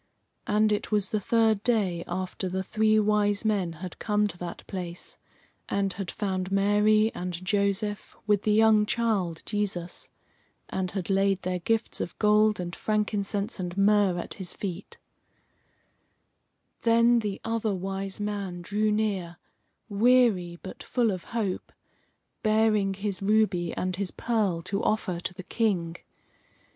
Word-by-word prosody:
And 215 +1 +3
it 210 - -1
was 205 -2 +1
the 215 - 0
third 220 0 +2
day 200 -8 +1
after 185 +1 -3
the 190 +1 -2
three 215 +2 +2
Wise 210 0 +2
Men 195 -6 +1
had 180 - -9
come 210 -1 +1
to 175 - -7
that 175 -1 -7
place 180 -3 -6 0.5
and 195 -1 0
had 190 -1 -5
found 190 -3 -2
Mary 210 +2 +3
and 180 0 -4
Joseph, 200 +1 0
with 210 -2 +3
the 215 - +1
young 215 0 +5
child, 205 -9 0
Jesus, 195 -5 -3 0.6
and 185 -1 -2
had 190 0 -3
laid 195 0 +2
their 180 0 -1
gifts 225 +5 -1
of - - -5
gold 210 0 +4
and 175 -1 -4
frankincense 210 0 -1
and 175 0 -4
myrrh 200 -2 +4
at 175 - -5
his 190 -3 -4
feet. 190 -1 -6 1.8
Then 235 +1 +4
the 210 -3 -3
Other 225 -2 0
Wise 195 +1 -4
Man 200 -4 -3
drew 210 +3 0
near, 195 -5 -1 0.5
weary, 210 -5 +3
but 190 - -8
full 240 -4 +1
of 185 -3 -5
hope, 215 -5 -3 0.7
bearing 215 -3 +2
his 200 0 -3
ruby 195 -4 +2
and 185 -1 -2
his 200 -2 -2
pearl 205 -8 -1
to 195 +3 -2
offer 200 -5 0
to 180 +1 -5
the 185 - -8
King. 180 -7 0
200 Hz, 145 wpm, -27 LUFS, 185-215 Hz, 1.8 s, young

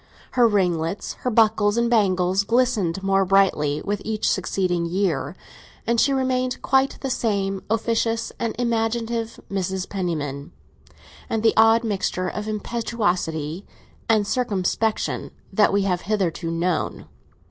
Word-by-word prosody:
Her 245 -2 +4
ringlets, 180 -3 0
her 250 - 0
buckles 215 -2 +3
and 235 0 +2
bangles, 190 -4 +2
glistened 215 -6 +1
more 195 0 +3
brightly 180 -7 +2
with 205 0 -2
each 215 -1 -1
succeeding 180 -2 0
year, 170 -5 -1 0.5
and 235 0 +2
she 280 - +3
remained 255 -1 0
quite 265 0 +2
the 270 - -2
same 195 -5 -1
officious 225 +1 0
and 230 -1 -2
imaginative 230 -1 -1
Mrs. 190 -1 -2
Penniman, 155 -5 -4 0.8
and 225 -1 -1
the 225 - +4
odd 225 +1 +5
mixture 190 -4 -1
of 210 +3 -4
impetuosity 200 -7 -2 0.5
and 215 -2 +3
circumspection, 220 -2 -1 0.2
that 210 - +4
we 200 0 +2
have 180 -2 0
hitherto 185 -4 -1
known. 165 0 -1
205 Hz, 125 wpm, -23 LUFS, 180-230 Hz, 0.8 s, odd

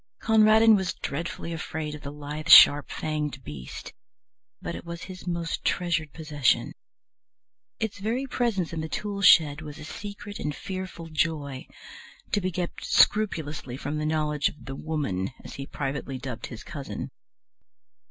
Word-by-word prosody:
Conradin 220 0 +6
was 190 -2 -1
dreadfully 170 +2 -4
afraid 155 -1 -4
of 150 - -8
the 140 - -6
lithe, 150 +1 -6
sharp 145 -2 +9
fanged 150 -3 -3
beast, 70 - -8 0.7
but - - -5
it - - -7
was 170 0 -7
his 185 -1 -9
most 170 -1 -2
treasured 165 -4 0
possession. 150 -5 +1 1.1
Its 220 -2 -3
very 230 +6 -1
presence 225 -10 -1
in 160 - -2
the 160 - -5
tool 205 +1 -3
shed 155 -5 +6
was 150 -2 -8
a - - -9
secret 205 +4 -7
and 150 -1 -3
fearful 185 -3 -6
joy, 150 -4 -2 0.6
to 205 - +2
be 185 0 -1
kept 175 0 -4
scrupulously 155 - +2
from 145 +2 -3
the 150 - -2
knowledge 150 -2 +1
of 135 -6 -14
the 135 - -6
Woman, 140 -13 -2
as - - -9
he 135 0 -7
privately 135 -1 -4
dubbed 125 -2 -6
his 115 - -9
cousin. 140 -3 -6
155 Hz, 150 wpm, -27 LUFS, 145-185 Hz, 1.1 s, sharp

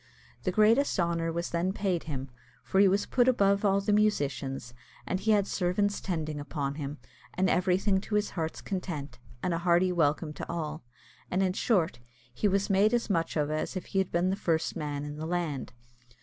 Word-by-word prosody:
The 185 - +2
greatest 220 +6 +3
honour 170 -1 0
was 170 +1 -3
then 175 +3 0
paid 190 -4 -1
him, 135 -4 -5 0.3
for 190 - +1
he 200 - +7
was 200 +2 +2
put 245 -1 +2
above 200 -5 +3
all 200 -1 +3
the 205 +1 0
musicians, 140 - 0 0.3
and 185 - -1
he 220 - -2
had 205 -2 +4
servants 200 +2 0
tending 155 -5 -3
upon 145 -1 -3
him, 145 0 -5 0.4
and 190 +1 +2
everything 190 +2 +2
to 210 - -3
his 210 0 +1
heart's 160 -2 -3
content, 155 -9 -5 0.2
and 180 - +1
a 165 - -1
hearty 175 +1 +3
welcome 155 -2 +1
to - - -7
all; 155 -2 -4 0.5
and, 185 +2 +1
in 185 -1 +1
short, 185 - +1 0.3
he 205 - +1
was 195 0 +1
made 205 +4 +4
as 230 -3 -1
much 165 -3 0
of 150 0 0
as 155 +5 -2
if 185 - -4
he 195 - -1
had 190 - 0
been 175 +2 +2
the - - 0
first 165 -5 0
man 145 -1 -3
in 145 0 -6
the 160 +1 -4
land. 165 -6 -2
180 Hz, 200 wpm, -29 LUFS, 155-195 Hz, 0.5 s, he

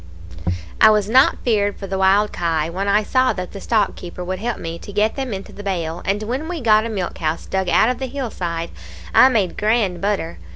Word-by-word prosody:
"I 220 - +9
was 210 -2 +2
not 255 +5 +4
feared 205 -4 +1
for 195 - -7
the 190 0 -3
wild 200 +2 +3
kye 165 -2 -1
when 195 +3 -3
I 205 +2 +3
saw 255 +4 +2
that 180 -1 -6
the 200 - -8
stockkeeper 195 -5 -1
would 185 +1 -3
help 235 +2 -2
me 165 0 -6
to - - -10
get 210 +2 +1
them 265 -3 -3
into 195 -1 -6
the - - -9
bail; 175 -4 -3
and 205 +2 0
when 255 +8 -3
we 350 -1 -4
got 220 -3 +3
a - - -6
milk 195 -5 -4
house 160 0 -2
dug 190 -1 -1
out 220 - +4
of 250 - -2
the 265 - -3
hill 260 -2 -4
side, 170 -2 -4 0.4
I 260 - +7
made 210 -8 0
grand 210 -5 +1
butter. 195 - -2
205 Hz, 225 wpm, -20 LUFS, 180-225 Hz, 0.4 s, I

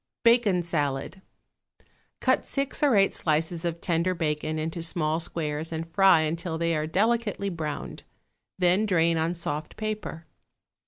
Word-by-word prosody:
=Bacon 230 -7 +4
Salad.= 150 +1 -2 1.0
Cut - - +2
six 275 -1 -2
or 285 -6 +4
eight 195 -1 +4
slices 160 +2 0
of 170 -1 -2
tender 175 +1 0
bacon 155 -1 -2
into 160 +2 -3
small 160 -1 0
squares 160 -1 -3
and 165 0 -4
fry 195 -4 +6
until 165 +1 -2
they 170 0 0
are 155 0 -1
delicately 210 +2 0
browned; 155 -5 -5 0.6
then 185 +4 +3
drain 165 -3 +2
on 165 +2 0
soft 150 -2 -4
paper. 215 -6 -4
170 Hz, 140 wpm, -26 LUFS, 160-190 Hz, 1.0 s, fry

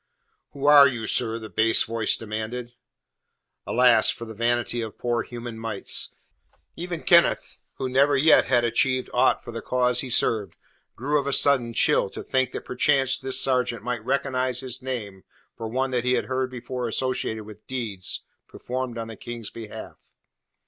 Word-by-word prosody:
"Who 140 0 -6
are 145 -1 +8
you, 120 -4 -4
sir?" 115 +1 0
the 110 -1 -8
bass 110 +1 +3
voice 115 -1 0
demanded. 115 +2 -6 0.9
Alas 120 -3 +4
for 115 - -4
the 110 - -9
vanity 120 +1 0
of 110 -2 -7
poor 120 -1 -1
human 120 -2 -8
mites! 110 -3 0 0.6
Even 175 -1 -6
Kenneth, 170 0 +3
who 130 - -3
never 140 +2 +3
yet 155 +4 +5
had 120 -2 +2
achieved 130 +2 +1
aught 125 +2 +2
for 120 - -8
the 115 0 -6
cause 125 -1 +1
he 130 - -4
served, 110 -3 +1 0.4
grew 145 +5 0
of 140 - -4
a - - 0
sudden 130 -5 +3
chill - - +3
to - - -8
think 130 -1 0
that - - -7
perchance 135 0 +2
this 130 - +1
sergeant 125 -4 +1
might 120 -3 -4
recognize 130 -1 -1
his 130 0 -6
name 110 -7 -6 0.3
for 115 - -6
one 130 +3 -2
that 125 -2 -1
he 125 0 +1
had - - 0
heard 130 0 -2
before 125 0 -5
associated 115 -2 0
with 105 0 -14
deeds 110 -8 -1 0.3
performed 125 -1 -5
on 115 -1 -5
the 115 - -9
King's 115 +1 -7
behalf. 115 -2 -11
125 Hz, 170 wpm, -24 LUFS, 115-130 Hz, 0.9 s, are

